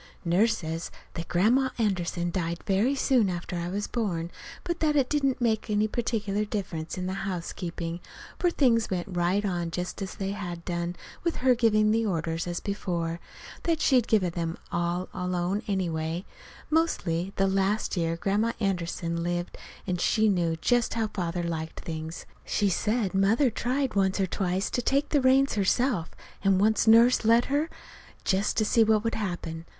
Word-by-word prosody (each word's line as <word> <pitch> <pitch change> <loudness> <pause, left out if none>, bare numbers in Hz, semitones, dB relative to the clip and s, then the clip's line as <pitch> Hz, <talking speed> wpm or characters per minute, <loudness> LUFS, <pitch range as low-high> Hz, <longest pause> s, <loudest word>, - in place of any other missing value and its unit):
Nurse 215 +7 +3
says 165 0 -4 0.2
that 165 -1 -5
Grandma 240 +9 +3
Anderson 175 -5 0
died 170 -1 -2
very 210 +8 +2
soon 255 -6 +3
after 175 0 -4
I 170 0 -3
was 205 +3 -2
born, 175 -8 -2 0.3
but 345 -1 -3
that 305 -2 +2
it 270 -3 +2
didn't 275 -3 +1
make 225 -3 0
any 210 0 +2
particular 210 -3 -1
difference 185 -7 -4
in 180 - -3
the 185 - -2
housekeeping; 175 -3 -4 0.4
for 355 - +3
things 240 -9 +2
went 180 -2 -1
right 180 +4 +1
on 175 -3 -1
just 180 +3 -4
as 190 - -4
they 195 0 -3
had 175 -4 -6
done, 175 0 -2 0.3
with 340 -1 0
her 255 0 +4
giving 215 -3 +3
the 225 +1 +2
orders 165 -4 -1
as 175 0 -2
before; 170 -4 -3 0.4
that 330 -2 0
she'd 255 -6 +3
given 190 -6 +2
them 165 -1 -3
all 175 +1 -1
alone 180 +2 -1
anyway, 170 -2 -1 0.5
mostly, 195 - +1
the 195 - +2
last 195 +3 +1
year 165 -1 0
Grandma 210 +6 +1
Anderson 170 -4 -1
lived, 175 +1 -2 0.3
and 180 -2 -2
she 220 -1 +3
knew 170 -4 +1
just 240 +9 +1
how 225 -2 0
Father 175 -3 -2
liked 160 -1 -4
things. 160 0 -6 0.2
She 205 - +1
said 210 +1 0
Mother 220 +7 +3
tried 255 +4 -1
once 190 0 +1
or 195 - +3
twice 185 +1 -1
to 245 - 0
take 280 +4 +1
the 290 - +3
reins 265 +2 +4
herself, 205 -2 +1 0.3
and 195 -1 +4
once 220 +2 +3
Nurse 230 +3 +6
let 230 +2 +5
her, 300 +3 +1 0.6
just 195 +1 +1
to 215 - +3
see 225 +2 +4
what 215 -1 +3
would 230 - -1
happen. 170 -5 -4
195 Hz, 170 wpm, -27 LUFS, 175-225 Hz, 0.6 s, Nurse